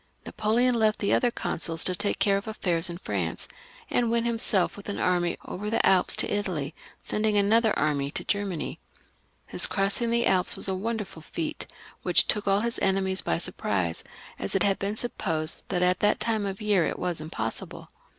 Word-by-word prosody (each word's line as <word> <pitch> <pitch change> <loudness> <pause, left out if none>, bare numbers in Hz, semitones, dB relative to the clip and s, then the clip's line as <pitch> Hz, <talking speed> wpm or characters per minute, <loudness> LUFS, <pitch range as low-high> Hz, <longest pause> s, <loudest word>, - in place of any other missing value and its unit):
Napoleon 235 +4 +1
left 220 -2 +2
the 200 - +1
other 245 - +3
consuls 165 -7 -1
to 185 - +3
take 200 +3 0
care 200 -1 +3
of 200 +2 -3
affairs 175 -5 0
in 170 - -5
France, 95 - -3 0.4
and 240 -2 +1
went 235 0 +1
himself 225 -5 +1
with 205 0 -9
an 205 - -3
army 175 -1 +1
over 210 +3 -5
the 225 - +1
Alps 185 -2 +5
to - - +2
Italy, 175 -8 -2 0.3
sending 215 -1 0
another 220 +2 +3
army 145 -2 0
to - - -2
Germany. 200 -5 -2 0.7
His - - +4
crossing 200 +4 +1
the 235 0 +2
Alps 185 -1 +2
was - - 0
a - - 0
wonderftd 195 -4 -4
feat, 315 -2 -4 0.3
which - - +4
took 210 -1 -1
all 195 +1 +3
his 235 0 -1
enemies 190 0 +1
by 80 - 0
surprise, 90 -3 -2 0.4
as 95 - -2
it - - +3
had 195 -1 +2
been 200 +2 -2
supposed 165 -9 -2
that 180 -2 0
at 180 0 +2
that 210 0 +2
time 220 -3 0
of 195 +2 -5
year 205 -4 +3
it - - -2
was 175 -3 -2
impossible. 115 -8 -6
195 Hz, 190 wpm, -27 LUFS, 175-215 Hz, 0.7 s, Alps